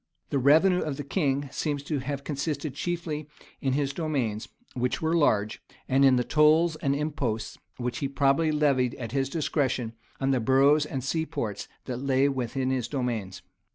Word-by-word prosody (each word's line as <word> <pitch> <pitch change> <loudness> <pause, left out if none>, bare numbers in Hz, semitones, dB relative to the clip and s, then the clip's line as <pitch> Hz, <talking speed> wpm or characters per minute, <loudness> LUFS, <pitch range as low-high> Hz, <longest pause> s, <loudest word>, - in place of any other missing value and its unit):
The 140 - +1
revenue 160 +8 +5
of 150 -3 -3
the 145 - -4
king 140 -2 0
seems 145 -3 -2
to 145 -1 -2
have 140 +1 -4
consisted 145 0 -3
chiefly 155 -1 -3 0.3
in 135 -1 0
his 140 0 0
demesnes, 130 -10 -2 0.3
which 125 0 -1
were 160 0 0
large; 110 -10 +2 0.3
and 135 +1 +3
in 135 -2 +6
the 125 - +2
tolls 155 +4 +4
and 140 -2 0
imposts 140 -7 -3 0.2
which 120 -1 -3
he 140 - -1
probably 140 +3 +2
levied 140 -5 +2
at 115 -3 -6
discretion 135 -3 -1 0.3
on 135 0 +1
the 130 - +2
boroughs 140 +5 +4
and 135 -4 -4
seaports 140 - -3 0.2
that 125 -2 -4
lay 135 +1 +2
within 130 -1 -1
his 125 -3 -1
demesnes. 110 -10 -3
140 Hz, 165 wpm, -27 LUFS, 125-150 Hz, 0.3 s, in